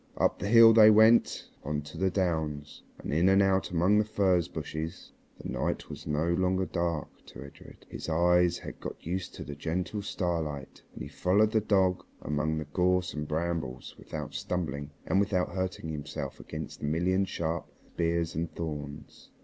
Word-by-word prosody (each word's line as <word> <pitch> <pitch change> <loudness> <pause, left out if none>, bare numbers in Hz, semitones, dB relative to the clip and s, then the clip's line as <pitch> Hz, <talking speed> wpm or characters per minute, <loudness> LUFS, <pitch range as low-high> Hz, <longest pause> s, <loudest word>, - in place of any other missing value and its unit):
Up - - +1
the 100 - -3
hill 115 +1 +8
they 110 -1 +8
went 110 +2 +5 0.2
on 75 0 -2
to 75 - -11
the 95 +3 +1
downs, 80 -6 -2 0.2
and - - -5
in 85 +5 +4
and 95 +1 +5
out 95 -1 +2
among 90 +5 +3
the - - +4
furze 95 -5 +1
bushes. 80 +1 -6 0.3
The - - -7
night - - -2
was - - -9
no 75 +2 0
longer 95 +1 +1
dark 85 -4 -2 0.2
to 65 - -10
Edred. 70 - -14
His - - -7
eyes 90 +2 +3
had - - -9
got - - -8
used 90 +2 -4
to - - -7
the 70 - -7
gentle 90 +8 -3
starlight, 80 -8 -3
and - - -6
he - - -6
followed 105 +4 +2
the 110 - +2
dog 95 -3 +2 0.2
among 75 +1 -1
the 75 - -3
gorse 90 +4 +1
and 75 -1 -4
brambles 80 -5 -3
without - - -7
stumbling 75 -5 -3 0.2
and 95 +4 +2
without 100 -3 +1
hurting 95 -3 -3
himself 75 -2 -5
against 80 -2 -7
the 75 - -3
million 90 +5 +1
sharp 85 -3 -3 0.3
spears 85 -1 0
and 80 +1 -3
thorns. 75 -3 -7
85 Hz, 175 wpm, -29 LUFS, 75-95 Hz, 0.3 s, hill